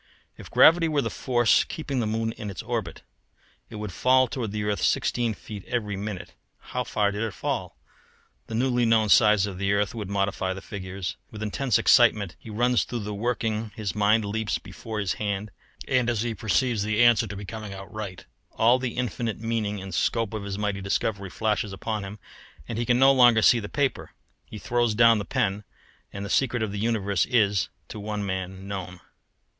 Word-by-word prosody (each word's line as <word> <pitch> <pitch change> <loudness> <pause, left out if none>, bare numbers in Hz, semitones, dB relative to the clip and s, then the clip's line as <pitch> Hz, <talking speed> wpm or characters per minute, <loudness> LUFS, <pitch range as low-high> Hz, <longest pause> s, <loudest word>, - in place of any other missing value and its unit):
If - - -12
gravity 165 +1 +6
were 150 -3 +1
the - - -3
force 120 -3 +3
keeping 140 -4 -4
the 115 - 0
moon 115 +1 -1
in 105 -2 -7
its 95 - -6
orbit, - - -4 0.7
it - - -10
would 105 -2 -5
fall 130 +7 +3
toward 115 -3 -4
the 105 0 -3
earth 105 -1 -1
sixteen 120 -3 +1
feet 105 -2 -9
every 105 -5 -2
minute. 100 -1 -6 0.2
How - - -4
far 105 -2 0
did 105 +1 -4
it 110 -3 -3
fall? - - -3 0.7
The 110 - -5
newly 125 0 +1
known 110 -2 +3
size 105 -2 +5
of 95 -3 -6
the 100 0 +1
earth 100 -1 0
would 105 -4 -5
modify 100 -1 -1
the - - -6
figures: 95 -3 -6
with 110 0 -7
intense 120 +3 +1
excitement 105 -6 +4
he - - -12
runs 120 +3 +2
through 120 -2 -5
the 105 0 -5
working, 110 0 -2
his 100 -5 -3
mind 105 +1 +3
leaps 110 +1 -1
before 110 -1 -7
his 100 -3 0
hand, 100 0 -2 0.4
and 125 -2 +2
as 115 -2 0
he 120 -1 -2
perceives 110 +2 0
the 110 +3 +2
answer 120 -1 +5
to 105 - -7
be 100 +1 -7
coming 110 0 -7
out 95 0 -9
right, 105 -4 -6 0.3
all 120 +3 +5
the 125 -2 -4
infinite 115 -1 -2
meaning 110 -2 -2
and 95 0 -8
scope 115 -3 0
of 110 - -3
his 100 -1 -5
mighty 105 -2 -2
discovery 100 0 -1
flashes 105 +1 -1
upon 105 +2 -3
him, 100 +2 -7 0.5
and 115 -1 -4
he 120 - -2
can 120 - +4
no 135 +1 +6
longer 120 -4 +6
see 120 - +6
the 100 -2 -6
paper. 140 -2 -1 0.4
He - - -9
throws 120 +1 0
down 115 -1 +6
the 100 - -4
pen; 105 -6 -1 0.5
and 100 0 -6
the - - -6
secret 120 -4 +1
of 105 - -2
the 100 - -4
universe 100 -5 0
is, 105 -6 +2 0.2
to 110 - -7
one 105 0 -3
man, 95 0 -4
known. 95 -3 -6
110 Hz, 200 wpm, -26 LUFS, 100-120 Hz, 0.7 s, gravity